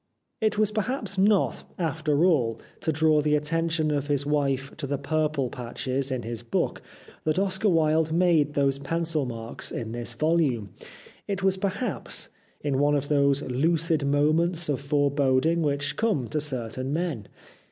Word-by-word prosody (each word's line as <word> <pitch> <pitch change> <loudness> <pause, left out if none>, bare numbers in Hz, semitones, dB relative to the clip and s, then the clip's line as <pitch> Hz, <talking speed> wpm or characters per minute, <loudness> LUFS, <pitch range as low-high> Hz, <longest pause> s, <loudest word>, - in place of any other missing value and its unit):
It 215 -1 +1
was 215 -1 +2
perhaps 215 -2 -2
not, 200 0 +3
after 155 -1 +1
all, 120 -11 +2 0.2
to 170 -5 0
draw 155 -1 +3
the 150 0 +2
at 150 - 0
tention 165 0 0
of 145 -1 -1
his 145 -1 0
wife 140 -2 0
to 150 -2 -4
the 140 +1 -1
purple 150 -2 -1
patches 130 +2 -3
in 130 -2 -2
his 115 0 -5
book 120 - -1 0.4
that 155 +1 0
Oscar 195 +2 +1
Wilde 160 -2 +2
made 160 -4 +3
those 140 -1 +2
pencil 160 0 -1
marks 115 -1 -5
in 110 -2 -4
this 120 0 -3
volume. 140 -7 +1 0.6
It 195 -1 -3
was, 190 -1 +3
perhaps, 200 +6 -2 0.3
in 140 -2 0
one 145 +1 +3
of 145 0 -1
those 140 -1 +3
lucid 160 +4 +1
moments 155 +4 +2
of 140 -2 0
foreboding 145 +2 +2
which 145 -1 0
come 205 - +1
to 155 - -1
certain 130 -2 -3
men. 155 - -2
150 Hz, 160 wpm, -26 LUFS, 135-165 Hz, 0.6 s, not